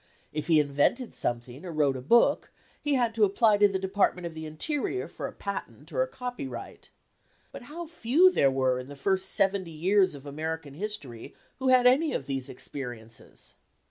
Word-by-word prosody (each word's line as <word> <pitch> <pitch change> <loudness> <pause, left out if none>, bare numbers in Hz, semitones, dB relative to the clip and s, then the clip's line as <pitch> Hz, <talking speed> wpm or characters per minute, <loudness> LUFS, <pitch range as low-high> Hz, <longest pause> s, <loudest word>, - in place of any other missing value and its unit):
If 150 0 -3
he 160 -2 +5
invented 145 - +1
something, 120 +4 -4
or 180 - -6
wrote 145 -4 +1
a 130 - -5
book, 235 - +3 0.3
he 295 -1 +1
had 240 -3 +1
to 220 -1 +2
apply 210 +1 +4
to 205 - +7
the 195 -1 -1
Department 190 -2 0
of 170 - -5
the 160 0 -7
Interior 290 - -2
for - - -6
a - - -8
patent 200 -1 -7
or - - +1
a - - +1
copyright. 250 - -7 0.6
But - - -9
how 340 +3 -6
few 330 +3 +4
there 140 - +3
were 130 -1 +1
in 125 - -8
the 145 - -9
first 190 +5 +1
seventy 195 -2 +2
years 185 +3 +2
of 140 0 -12
American 155 0 -5
history 150 - -6 0.2
who 260 - -1
had 255 -1 +5
any 280 +6 +4
of 135 - -3
these 135 -2 -4
experiences! 120 -4 -8
185 Hz, 185 wpm, -28 LUFS, -, 0.6 s, to